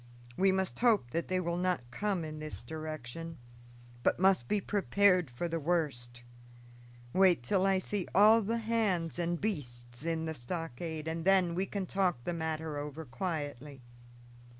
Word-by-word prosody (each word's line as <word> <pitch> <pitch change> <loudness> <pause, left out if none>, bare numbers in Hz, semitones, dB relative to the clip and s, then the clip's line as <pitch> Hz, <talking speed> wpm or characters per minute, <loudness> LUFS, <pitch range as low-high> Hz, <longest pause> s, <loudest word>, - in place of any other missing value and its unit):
We 195 +5 +4
must 190 -1 -1
hope 220 - +3
that 170 +4 -1
they 185 0 0
will 170 -1 -1
not 180 -10 -1
come 195 0 -1
in 155 0 -6
this 155 0 -7
direction, 155 0 -6 0.6
but - - +2
must 190 -10 +4
be 210 - +1
prepared 195 -4 +3
for 120 +8 -3
the 165 0 -2
worst. 140 -8 -1 0.9
Wait 185 -8 +4
till 190 +9 +2
I 195 -1 +3
see 190 0 -2
all 215 +3 +7
the 225 +3 -1
hands 215 -8 0
and 170 0 0
beasts 120 - -4
in 165 -1 -1
the 160 - -2
stockade, 160 +2 -5
and 165 0 -3
then 185 -2 +4
we 190 +3 -1
can 200 -2 -3
talk 180 -9 0
the 175 - -2
matter 160 -2 -3
over 150 +2 -6
quietly." 145 -3 -4
165 Hz, 160 wpm, -32 LUFS, 150-190 Hz, 0.9 s, all